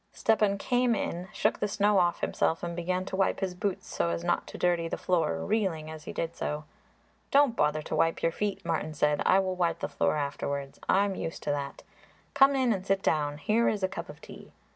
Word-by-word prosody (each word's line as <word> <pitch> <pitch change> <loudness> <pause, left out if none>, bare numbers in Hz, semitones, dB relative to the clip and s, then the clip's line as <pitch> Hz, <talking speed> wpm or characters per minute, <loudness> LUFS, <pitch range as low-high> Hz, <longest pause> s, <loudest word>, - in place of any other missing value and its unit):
Stepan 210 -2 +2
came 245 +2 +1
in, 180 -2 -3
shook - - 0
the 210 - 0
snow 205 0 +3
off 175 -1 +1
himself 165 - 0
and 170 -1 -3
began 180 +2 -1
to 190 - -4
wipe 195 0 +1
his 190 -2 -2
boots 185 +1 -3
so 85 - -1
as 85 0 -2
not - - 0
to - - -8
dirty 175 -2 +1
the - - -3
floor, 85 - 0
reeling 165 -8 -1
as 155 -1 -10
he - - -5
did 165 0 -3
so. 150 +1 -3 0.7
"Don't 280 -4 +4
bother 150 -2 +1
to - - -3
wipe 165 0 +1
your 165 - +3
feet," 205 +2 -3
Martin 160 -2 -2
said; 150 0 +2
"I 185 - +6
will 190 -1 +1
wipe 175 -2 0
the - - -3
floor - - 0
afterwards; 140 -1 -3
I 195 +1 +4
am 200 - -2
used 165 -3 -5
to 145 - 0
that. 140 -1 -4 0.5
Come 275 0 +6
in 255 -3 +3
and 190 -2 -4
sit 195 0 0
down. 145 -2 +1
Here 220 +9 +2
is 205 -2 -2
a - - +4
cup 180 -3 -7
of 150 - -11
tea." - - -12
180 Hz, 230 wpm, -29 LUFS, 155-200 Hz, 0.7 s, I